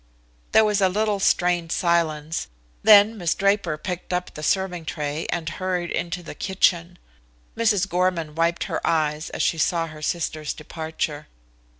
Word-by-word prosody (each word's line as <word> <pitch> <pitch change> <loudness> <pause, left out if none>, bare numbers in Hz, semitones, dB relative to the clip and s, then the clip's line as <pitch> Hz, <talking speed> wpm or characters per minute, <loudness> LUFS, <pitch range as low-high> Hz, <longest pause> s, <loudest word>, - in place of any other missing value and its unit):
There 220 - +6
was 210 -1 +1
a 190 - +4
little 210 +1 0
strained 175 -3 +1
silence, 165 -3 0 0.3
then 215 +1 +6
Miss 175 -2 0
Draper 195 -5 +1
picked 180 +2 -5
up 180 0 -2
the 150 - -8
serving 180 +1 -1
tray 150 0 -3
and 170 -2 -3
hurried 180 +1 -2
into 175 +1 -3
the - - -8
kitchen. 180 -2 0 0.6
Mrs. 215 -4 +2
Gorman 180 -4 0
wiped 165 +2 0
her - - -3
eyes 155 -1 0
as - - -2
she 165 - +1
saw 165 +1 +1
her 155 -1 -10
sister's 155 -1 -2
departure. 155 -1 -5
175 Hz, 155 wpm, -23 LUFS, 160-190 Hz, 0.6 s, There